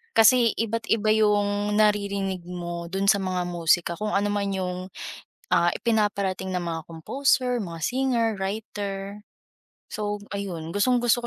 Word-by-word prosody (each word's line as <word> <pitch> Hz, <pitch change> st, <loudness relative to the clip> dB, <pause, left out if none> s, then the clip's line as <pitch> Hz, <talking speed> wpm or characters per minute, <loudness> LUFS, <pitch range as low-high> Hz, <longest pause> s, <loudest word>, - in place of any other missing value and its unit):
Kasi 230 Hz, +1 st, +6 dB
iba't 230 Hz, +1 st, -2 dB
iba 215 Hz, -1 st, +3 dB
'yung 205 Hz, -1 st, +2 dB
naririnig 200 Hz, -3 st, +1 dB
mo 175 Hz, -1 st, -5 dB
do'n 195 Hz, +1 st, -1 dB
sa 200 Hz, 0 st, +5 dB
mga 185 Hz, -2 st, -1 dB
musika 170 Hz, 0 st, +2 dB
kung 210 Hz, 0 st, -2 dB
anoman 205 Hz, 0 st, 0 dB
'yung, 180 Hz, -1 st, -2 dB, 0.7 s
ah, 170 Hz, 0 st, +4 dB
ipinaparating 200 Hz, -4 st, 0 dB
ng 180 Hz, -, -1 dB
mga 165 Hz, -1 st, -3 dB
composer, 250 Hz, -, +1 dB
mga 165 Hz, -3 st, -7 dB
singer, 245 Hz, +2 st, +1 dB
writer. 200 Hz, 0 st, -4 dB, 0.7 s
So, 205 Hz, -1 st, -3 dB
ayun, 180 Hz, -5 st, -4 dB
gustong-gusto 240 Hz, +3 st, +2 dB
205 Hz, 130 wpm, -25 LUFS, 180-220 Hz, 0.7 s, Kasi